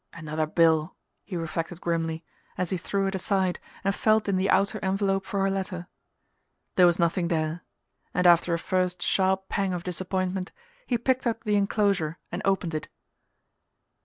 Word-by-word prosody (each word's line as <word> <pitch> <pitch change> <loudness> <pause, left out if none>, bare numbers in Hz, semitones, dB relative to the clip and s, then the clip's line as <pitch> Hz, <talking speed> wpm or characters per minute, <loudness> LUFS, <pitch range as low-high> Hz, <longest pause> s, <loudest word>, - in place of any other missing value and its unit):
"Another 155 -1 -2
bill!" 160 -1 +3 0.3
he 185 -2 -5
reflected 165 +1 -4
grimly, 165 -1 -2 0.3
as 180 -2 -1
he 185 - +1
threw 195 +3 -1
it 195 - -1
aside 190 -1 0 0.2
and 195 0 +2
felt 215 +1 +2
in 200 - +2
the 185 +1 +1
outer 200 +3 +2
envelope 195 0 0
for 200 - -1
her 195 - +2
letter. 185 -2 -3 0.9
There 180 -1 +7
was 175 - +3
nothing 170 +1 +1
there, 160 0 -1 0.5
and 180 - 0
after 175 0 +6
a - - -1
first 180 0 -1
sharp 190 0 +1
pang 195 -2 -1
of 175 -1 -3
disappointment 185 +1 -2 0.4
he 245 - +1
picked 260 +2 +1
up 230 -1 -2
the 210 -2 +1
enclosure 200 -5 +1
and - - -3
opened 190 -4 +1
it. 155 - -3
185 Hz, 165 wpm, -27 LUFS, 170-195 Hz, 0.9 s, There